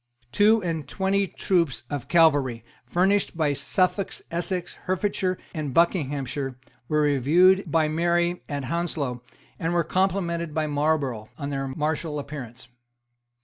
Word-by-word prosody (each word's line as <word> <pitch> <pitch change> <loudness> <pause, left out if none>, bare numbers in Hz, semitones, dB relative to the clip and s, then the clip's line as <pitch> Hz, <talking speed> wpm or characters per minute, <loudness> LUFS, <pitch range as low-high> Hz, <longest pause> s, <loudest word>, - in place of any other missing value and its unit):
Two 210 - +4
and 160 -5 -3
twenty 195 +4 0
troops 170 -9 0
of 145 -2 -5
cavalry, 145 -9 +3 0.2
furnished 190 0 +1
by 150 -3 +2
Suffolk, 185 +6 0 0.2
Essex, 175 +1 -2
Hertfordshire 185 0 0 0.2
and 150 -6 -4
Buckinghamshire, 145 -6 0 0.3
were 150 0 +2
reviewed 160 +6 +4
by 160 -1 +3
Mary 170 +2 +1
at 145 -2 -3
Hounslow, 145 -4 -2 0.4
and 165 +1 -1
were 170 - +3
complimented 170 -3 -1
by 155 -1 +1
Marlborough 145 -7 0
on 145 -1 -4
their 135 -1 -2
martial 150 +2 -2
appearance. 130 -4 -7
160 Hz, 125 wpm, -25 LUFS, 140-175 Hz, 0.4 s, Two